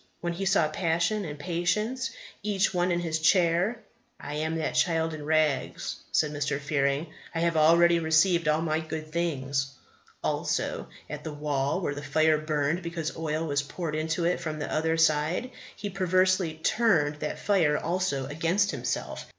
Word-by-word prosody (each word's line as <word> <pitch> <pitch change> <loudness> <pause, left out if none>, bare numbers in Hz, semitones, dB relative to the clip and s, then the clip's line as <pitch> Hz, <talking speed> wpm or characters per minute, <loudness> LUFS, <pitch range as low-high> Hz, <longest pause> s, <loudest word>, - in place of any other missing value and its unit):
When 175 0 -2
he 195 +3 -3
saw 190 -5 +3
Passion 170 +5 0
and 150 -2 -6
Patience, 185 - -1 0.3
each 200 -2 +1
one 180 0 +1
in 175 0 +1
his 160 -2 -1
chair 175 +5 +3 0.4
"I 145 - -6
am 160 +2 -1
that 160 - -2
child 165 -2 +1
in 155 -1 -6
rags," 155 -3 0
said 150 -1 +2
Mr. 145 -1 -1
Fearing; 140 +2 0 0.2
"I 165 - 0
have 170 -1 +1
already 170 +2 +5
received 165 +1 +3
all 155 +1 +2
my 155 -1 0
good 155 -1 -6
things!" 140 -5 -1 0.5
Also, - - -1 0.2
at - - -7
the 155 - -5
wall 145 +2 -1
where 145 - -1
the 145 - -6
fire 155 +2 +2
burned 155 +2 0
because 170 -2 -4
oil 160 0 -2
was 145 -2 0
poured 155 +2 -5
into 155 +2 -1
it 175 +1 +1
from 155 -2 -4
the 150 - -4
other 160 +1 +1
side, 160 - +2 0.2
he 205 - -5
perversely 185 -2 +2
turned 160 -4 +2
that 150 - -4
fire 165 -8 +2
also 170 -6 -1
against 165 +8 +1
himself. - - -4
160 Hz, 165 wpm, -27 LUFS, 150-175 Hz, 0.5 s, already